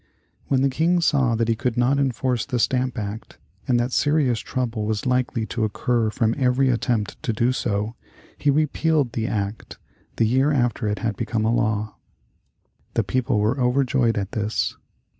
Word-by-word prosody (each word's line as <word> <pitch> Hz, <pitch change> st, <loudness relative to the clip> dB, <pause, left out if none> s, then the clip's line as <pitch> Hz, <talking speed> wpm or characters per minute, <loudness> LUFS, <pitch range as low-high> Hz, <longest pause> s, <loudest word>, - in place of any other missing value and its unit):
When 135 Hz, -1 st, +2 dB
the 140 Hz, -, +3 dB
King 165 Hz, +6 st, +2 dB
saw 135 Hz, -8 st, +2 dB
that 115 Hz, 0 st, 0 dB
he 115 Hz, -, +3 dB
could 125 Hz, 0 st, -2 dB
not 130 Hz, +3 st, +2 dB
enforce 125 Hz, -2 st, 0 dB
the 130 Hz, -4 st, -2 dB
Stamp 125 Hz, +2 st, 0 dB
Act, 105 Hz, 0 st, -6 dB, 0.3 s
and 120 Hz, -2 st, +3 dB
that 120 Hz, +2 st, -1 dB
serious 145 Hz, -5 st, +2 dB
trouble 115 Hz, -5 st, -3 dB
was 110 Hz, -1 st, -2 dB
likely 125 Hz, -3 st, 0 dB
to 115 Hz, 0 st, -3 dB
occur 115 Hz, +1 st, 0 dB
from 110 Hz, +1 st, +1 dB
every 130 Hz, +1 st, +3 dB
attempt 120 Hz, -3 st, -1 dB
to -, -, -1 dB
do 120 Hz, +3 st, +1 dB
so, 105 Hz, -3 st, -2 dB, 0.4 s
he 145 Hz, -, 0 dB
repealed 150 Hz, -1 st, +1 dB
the 115 Hz, -1 st, -1 dB
act, 105 Hz, -1 st, -4 dB, 0.4 s
the 115 Hz, -, +2 dB
year 130 Hz, +6 st, +2 dB
after 120 Hz, -5 st, 0 dB
it 105 Hz, 0 st, -1 dB
had 110 Hz, -2 st, 0 dB
become 110 Hz, -2 st, -1 dB
a 115 Hz, -, +2 dB
law. 110 Hz, -2 st, -1 dB, 1.0 s
The -, -, +2 dB
people 125 Hz, -3 st, 0 dB
were 110 Hz, +6 st, +1 dB
overjoyed 125 Hz, -2 st, +2 dB
at 100 Hz, -1 st, -3 dB
this. 110 Hz, -1 st, -1 dB
120 Hz, 175 wpm, -23 LUFS, 110-130 Hz, 1.0 s, the